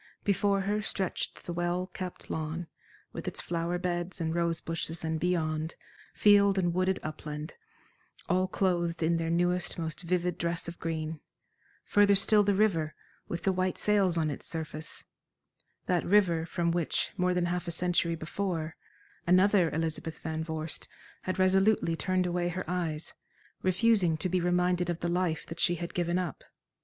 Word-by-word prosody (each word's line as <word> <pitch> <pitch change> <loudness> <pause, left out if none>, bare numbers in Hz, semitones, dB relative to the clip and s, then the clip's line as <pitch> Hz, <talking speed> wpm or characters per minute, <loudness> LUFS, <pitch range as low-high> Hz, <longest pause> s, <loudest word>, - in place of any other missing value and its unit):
Before 200 0 +2
her 205 +2 0
stretched 195 -2 -2
the 175 - -4
well 175 +1 0
kept 185 -1 -6
lawn, 160 +2 -3 0.5
with - - -6
its - - -2
flower 170 +1 -1
beds 175 0 -2
and 160 -1 -1
rose 170 -1 0
bushes 165 0 -4
and 160 0 -1
beyond, 160 -2 0 0.4
field 200 -1 +5
and 175 -2 +2
wooded 185 +1 +1
upland, 150 0 -6 0.7
all 185 +1 +2
clothed 175 -3 0
in 165 +1 +3
their 165 0 -1
newest, 175 +1 +1
most 160 -1 -4
vivid 180 0 -1
dress 170 0 -2
of 170 - -7
green; 160 -1 -3 0.7
further 205 -1 +5
still 210 +1 +6
the 205 -1 +2
river, 170 -7 +2 0.3
with 170 - -4
the 195 - +3
white 185 -1 0
sails 195 -4 +3
on 155 -2 +1
its 140 - -7
surface 160 -1 -5 0.8
that 180 -2 +1
river 175 -4 +3
from 170 -1 0
which, 170 -2 0
more 180 -2 +1
than 180 -1 +2
half 175 0 -2
a - - -1
century 170 -1 +1
before, 165 -1 -3 0.5
another 185 0 +5
Elizabeth 160 0 -2
Van 160 0 -3
Vorst 160 0 -4 0.3
had 185 - -3
resolutely 190 -2 +3
turned 185 +2 0
away 175 0 0
her 185 +1 -4
eyes, 170 -3 -2 0.5
refusing 185 -3 +3
to 185 - -2
be 180 0 +1
reminded 180 0 +2
of 170 -1 -2
the 175 - 0
life 170 -2 0
that 165 +1 -8
she 175 - +3
had 170 0 -5
given 175 0 0
up. 180 -5 -3
175 Hz, 165 wpm, -30 LUFS, 165-185 Hz, 0.8 s, still